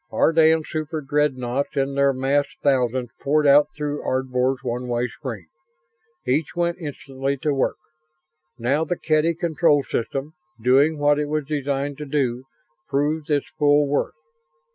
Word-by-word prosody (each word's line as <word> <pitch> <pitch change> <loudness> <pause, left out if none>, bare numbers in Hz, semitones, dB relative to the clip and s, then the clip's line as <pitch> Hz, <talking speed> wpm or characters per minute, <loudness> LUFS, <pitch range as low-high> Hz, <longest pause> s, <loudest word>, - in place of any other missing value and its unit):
Ardan 160 0 +4
superdreadnoughts 145 -5 -2
in 135 0 0
their 140 0 +3
massed 135 +2 0
thousands 125 -3 +1
poured 150 +2 +2
out 145 +1 +6
through 145 -1 -3
Ardvor's 130 0 -1
one 125 0 -3
way 120 0 0
screen. 115 - -7 0.8
Each 135 +4 0
went 170 0 -1
instantly 140 -3 -4
to 150 - +1
work. 135 - 0 0.8
Now 135 +6 +1
the 175 +1 -2
Kedy 155 +1 +1
control 160 -4 +2
system, 135 +5 -3 0.3
doing 135 +7 +3
what 145 0 +3
it 150 - -1
was 150 -1 -2
designed 140 -1 -2
to 150 - -6
do, 130 -3 -1 0.4
proved 145 +2 -1
its 145 -2 +1
full 145 0 +4
worth. 145 +2 -1
145 Hz, 140 wpm, -23 LUFS, 130-150 Hz, 0.8 s, out